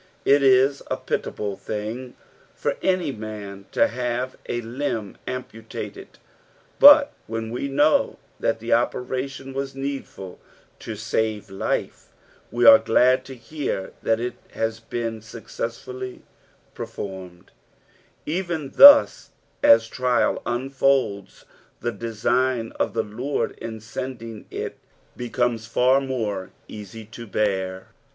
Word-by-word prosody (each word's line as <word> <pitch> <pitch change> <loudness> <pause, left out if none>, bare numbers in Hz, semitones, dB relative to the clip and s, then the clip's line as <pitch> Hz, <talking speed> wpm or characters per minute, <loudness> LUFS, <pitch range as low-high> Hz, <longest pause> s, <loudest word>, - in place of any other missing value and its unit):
It 140 +1 +5
is 135 +1 +4
a - - -1
pitiable 100 -2 -3
thing 110 +6 -5 0.4
for - - -1
any 185 -5 +1
man 105 -4 -8
to - - +3
have 125 +1 -3
a 120 - -1
limb 115 -3 -4
amputated, 125 - -7 0.6
but 290 0 +9
when 115 0 -4
ne 125 - -2
know 145 +3 +2 0.2
that 115 - 0
the 115 +2 -5
operatiun 130 +3 -1
was 135 0 -4
needful 135 -9 -6 0.4
to 110 - -6
save 110 -1 -2
life, 95 - -3 0.4
we 120 - +1
are 280 0 +10
glad 130 +1 +3
to 135 - -9
hear 125 -6 -4
that 115 0 +1
it 120 +1 -3 0.2
has 110 0 -2
been 115 -1 -4
successfully 115 +3 -7 0.5
performed; 95 -3 -8 0.7
even 165 -3 -3
thus 285 0 +8 0.3
os 115 0 +7
trial 125 +1 +1
unfolds, 130 -4 0 0.3
the 120 - -2
design 115 +2 -1
cf - - 0
the 115 - 0
Lord 125 +7 -2
in 110 -1 -6
sending 115 -1 -7
it - - -5 0.4
becomes 120 -2 -1
far 130 +3 +3
more 110 -8 -3 0.2
easy 105 +1 -9
to 115 +2 -10
bear. 95 -3 -1
120 Hz, 115 wpm, -23 LUFS, 110-135 Hz, 0.7 s, are